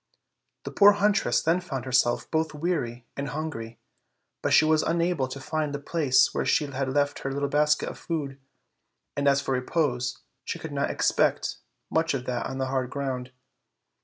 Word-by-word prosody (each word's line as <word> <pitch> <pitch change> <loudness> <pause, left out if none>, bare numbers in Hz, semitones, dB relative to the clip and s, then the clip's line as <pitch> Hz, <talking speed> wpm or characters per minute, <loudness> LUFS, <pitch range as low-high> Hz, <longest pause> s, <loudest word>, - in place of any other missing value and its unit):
The - - -6
poor 205 0 +7
huntress 205 - +2
then 170 +3 +2
found 135 -8 -5
herself 125 -2 +2
both 160 -1 0
weary 145 -8 -2
and 140 0 -3
hungry; 125 -6 -5 0.6
but - - -1
she 155 - +6
was 155 0 +3
unable 170 -4 0
to 130 +2 -7
find 150 +1 -2
the - - -4
place 145 -3 +2
where - - 0
she 150 - +2
had 135 -1 -3
left 145 +1 +1
her 135 - -3
little 140 +1 -1
basket 150 +1 +2
of - - -7
food, 145 -5 -4 0.8
and 140 0 0
as 140 0 +4
for 135 - -3
repose, 125 -2 0 0.3
she - - -4
I - - -15
could - - -5
not - - 0
expect - - +1 0.3
much 160 -2 +1
of 125 -2 -4
that 125 -2 -2
on 135 - -5
the 135 - -1
hard 130 -1 -1
ground. 130 -2 -4
140 Hz, 185 wpm, -26 LUFS, 130-160 Hz, 0.8 s, poor